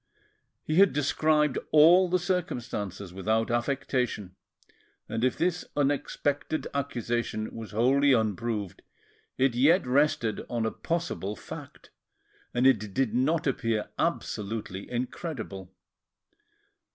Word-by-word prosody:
He 155 - -1
had 195 0 +6
described 150 0 +2
all 170 +4 +6
the 185 - +3
circumstances 115 - -3
without 110 +4 0
affectation, 120 -5 -1 0.7
and 115 +1 -3
if 130 - +1
this 175 0 0
unexpected 145 +1 -1
accusation 120 -5 -2
was 115 -2 -7
wholly 135 +6 +3
unproved, 110 -3 -1 0.6
it 130 -1 +3
yet 145 +9 +4
rested 125 -4 +1
on 120 -2 -1
a 110 - 0
possible 165 - -3
fact, - - -10 0.6
and 125 +1 +1 0.3
did 130 -5 +1
not 145 +7 +1
appear 115 -5 -1
absolutely 105 -2 -3
incredible. 120 - -5
125 Hz, 105 wpm, -28 LUFS, 110-150 Hz, 0.7 s, had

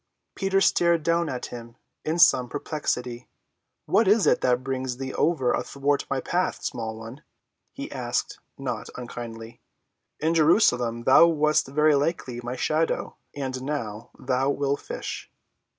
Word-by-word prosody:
Peter 195 0 +1
stared 170 -4 +3
down 170 0 +1
at 125 -2 -4
him 115 -1 -9 0.3
in 160 +2 -1
some 125 -7 +5
perplexity. 125 -4 -3 0.6
"What 225 - +3
is 210 +1 +4
it - - +3
that 125 0 +2
brings 130 -2 -3
thee 130 0 -5
ever 140 -7 +1
athwart 140 0 -1
my 135 - 0
path, 180 +7 -1
small 110 -1 -4
one?" 115 +6 -10 0.5
he - - -7
asked, - - -2 0.2
not - - -4
unkindly. 115 -2 -8 0.6
"In 160 +2 +1
Jerusalem 125 - +3
thou 130 +7 +7
wast 155 -3 +2
verily 150 +3 +3
like 120 -5 -8
my 120 +1 -4
shadow—and 140 -3 -2
now, 120 -6 -4
thou 130 +1 0
wilt 140 0 0
fish." - - -6
135 Hz, 135 wpm, -25 LUFS, 125-155 Hz, 0.6 s, thou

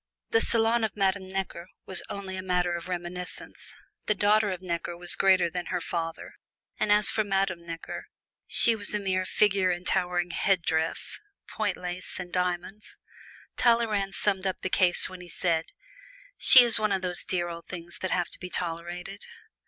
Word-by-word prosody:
The 225 - +3
salon 230 0 +2
of 215 -1 -3
Madame 190 -1 0
Necker 190 -2 -5 0.2
was 190 -2 -2
only 195 -1 -6
a 185 - -5
matter 180 -1 0
of 170 0 -7
reminiscence. 180 0 -7 0.3
The 215 - +2
daughter 210 +1 +2
of 185 -2 -4
Necker 170 -1 -4
was 175 0 +8
greater 190 -2 +3
than 175 +1 -5
her 180 - -2
father, 165 -1 -5 0.5
and 210 - 0
as 210 0 +5
for 215 - 0
Madame 195 -4 -2
Necker, 165 -1 -7 0.4
she 230 - +4
was 210 -1 0
a - - 0
mere 185 -2 -1
figure 195 -3 +2
in 175 0 -3
towering 180 -2 0
headdress, 165 -4 -1 0.3
point 215 -2 -2
lace 180 +1 -6
and 180 -1 -8
diamonds. 180 +3 -3 0.6
Talleyrand 220 -5 +1
summed 195 -2 -1
up 185 - -4
the 185 - -2
case 180 -2 +5
when 185 -1 -10
he 175 - -12
said, 165 -1 -1 0.7
"She 255 - +8
is 235 -2 +7
one 215 -1 0
of 190 -1 -1
those 180 -1 -1
dear 175 -2 -1
old 170 0 -9
things 170 -4 -8
that 185 - -3
have 175 -1 -1
to - - -5
be 180 - -7
tolerated." 175 +3 -5
185 Hz, 175 wpm, -27 LUFS, 175-200 Hz, 0.7 s, was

